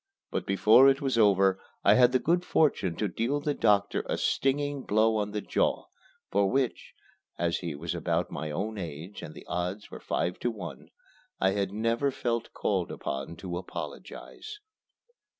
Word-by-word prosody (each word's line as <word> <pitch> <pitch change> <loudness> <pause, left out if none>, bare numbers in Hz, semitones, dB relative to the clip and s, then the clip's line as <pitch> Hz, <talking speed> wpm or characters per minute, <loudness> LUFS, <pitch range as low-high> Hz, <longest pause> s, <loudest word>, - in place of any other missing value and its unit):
But - - -3
before 110 +7 +6
it 135 0 +2
was 135 -3 0
over 95 -2 +4 0.2
I 100 - +7
had 125 +1 +6
the 130 - +4
good 175 +6 +1
fortune 120 - +2
to 105 - -1
deal 115 +10 -1
the 145 0 -1
doctor 105 -6 +2
a - - -1
stinging 145 +1 0
blow 110 0 +2
on 105 -1 -1
the 105 0 -3
jaw, - - 0 0.5
for 100 0 +3
which 130 0 -1 0.4
(as 85 -1 0
he 85 -4 -4
was 80 +3 -4
about - - -1
my 75 +2 -4
own 100 +7 -3
age 85 +3 -7
and - - -9
the - - -11
odds 90 +4 -4
were - - -8
five 90 - -2
to 120 - 0
one) 100 -7 -8 0.5
I 95 - +3
have 100 -1 -1
never 115 +6 0
felt 120 -3 -2
called - - -1
upon 70 +4 -5
to 90 0 -5
apologize. 420 - -8
105 Hz, 170 wpm, -28 LUFS, 90-125 Hz, 0.5 s, I